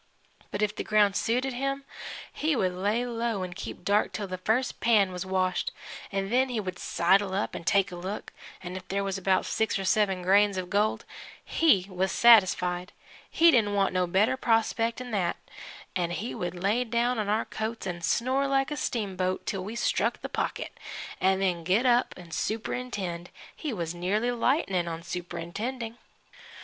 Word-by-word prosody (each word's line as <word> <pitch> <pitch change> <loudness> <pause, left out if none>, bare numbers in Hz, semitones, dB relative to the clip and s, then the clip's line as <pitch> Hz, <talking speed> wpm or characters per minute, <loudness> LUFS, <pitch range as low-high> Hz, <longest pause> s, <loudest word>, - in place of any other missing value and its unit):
But 205 - -2
if 210 0 0
the - - -3
ground 210 -2 +3
suited 250 +5 0
him, 275 +2 -2 0.5
he 310 0 0
would 185 -6 +1
lay 205 +6 0
low 230 -4 -2
'n' 180 -1 -5
keep 180 -1 -7
dark 205 +2 +2
till 210 - -4
the 185 -1 -5
first 235 +6 0
pan 210 -5 +4
was 180 +1 -5
washed, 185 -1 0 0.4
'n' 195 0 -2
then 260 +2 +3
he 240 -3 -1
would 185 -3 -5
sidle 190 +2 +2
up 200 - -1
'n' - - -7
take 195 0 +3
a - - -6
look, 190 +4 -6 0.3
an' 180 0 -6
if 185 0 -8
there 200 +1 -1
was 195 -1 -2
about 190 0 +2
six 220 -1 0
or 195 - -3
seven 190 -2 +2
grains 200 +1 +4
of 180 -1 -4
gold 210 +2 +1 0.4
he 290 - +3
was 190 0 -1
satisfied 185 -6 +4 0.4
he 335 +1 +6
didn't 210 -6 +3
want 195 -1 +2
no 180 -1 +1
better 195 +8 +3
prospect 230 -1 +1
'n' 250 -1 -7
that 185 -5 0 0.6
'n' 175 -2 0
then - - -6
he 225 +5 -4
would 175 0 -4
lay 200 +7 +1
down 240 0 0
on 205 -1 -1
our 215 +2 +1
coats 220 +1 -4
and 175 -2 -4
snore 260 +8 +1
like 270 +1 +1
a 295 - -2
steamboat 190 -8 -2
till 195 -2 -2
we'd 210 +4 -6
struck 235 - 0
the - - -2
pocket, - - -3 0.4
an' 190 +1 +3
then 180 -3 0
get 195 +9 +2
up 245 0 +3
'n' 175 -2 -12
superintend. 205 -3 -3 0.3
He 305 - -4
was 170 -6 -3
nearly 200 +7 0
lightnin' 230 - +1
on 165 0 -5
superintending. 180 +8 -5
200 Hz, 185 wpm, -28 LUFS, 185-235 Hz, 0.6 s, he